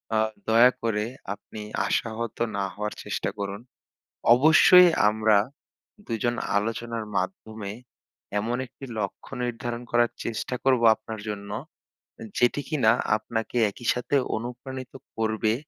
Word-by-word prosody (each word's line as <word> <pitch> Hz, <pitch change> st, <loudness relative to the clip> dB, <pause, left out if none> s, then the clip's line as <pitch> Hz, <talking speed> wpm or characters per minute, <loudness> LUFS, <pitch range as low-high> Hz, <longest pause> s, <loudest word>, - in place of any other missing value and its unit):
আ -, -, +3 dB, 0.3 s
দয়া 115 Hz, +3 st, +7 dB
করে 105 Hz, -2 st, 0 dB, 0.3 s
আপনি 105 Hz, +1 st, -10 dB, 0.3 s
আশাহত 115 Hz, 0 st, -2 dB, 0.2 s
না 100 Hz, -, 0 dB
হওয়ার 105 Hz, +1 st, -4 dB
চেষ্টা -, -, -2 dB
করুন। 100 Hz, +2 st, -4 dB, 0.7 s
অবশ্যই 160 Hz, +5 st, +8 dB, 0.2 s
আমরা 110 Hz, -1 st, +3 dB, 0.7 s
দুইজন 120 Hz, +1 st, -1 dB, 0.2 s
আলোচনার 115 Hz, +1 st, -2 dB
মাধ্যমে 110 Hz, -, -4 dB, 0.7 s
এমন 120 Hz, +3 st, -1 dB
একটি 135 Hz, +2 st, -11 dB
লক্ষ্য 100 Hz, -2 st, -5 dB
নির্ধারণ 120 Hz, 0 st, -3 dB
করার 120 Hz, 0 st, +3 dB
চেষ্টা 115 Hz, +2 st, -3 dB
করব 130 Hz, -3 st, +3 dB
আপনার 110 Hz, -1 st, -8 dB
জন্য, 100 Hz, -1 st, -5 dB, 0.9 s
যেটি 125 Hz, +4 st, +3 dB
কিনা 125 Hz, -8 st, +4 dB, 0.3 s
আপনাকে 115 Hz, +2 st, -4 dB, 0.2 s
একই 120 Hz, -, -12 dB
সাথে 125 Hz, +3 st, -2 dB, 0.2 s
অনুপ্রাণিত 125 Hz, +3 st, -6 dB, 0.2 s
করবে 110 Hz, 0 st, +1 dB
115 Hz, 115 wpm, -26 LUFS, 110-125 Hz, 0.9 s, অবশ্যই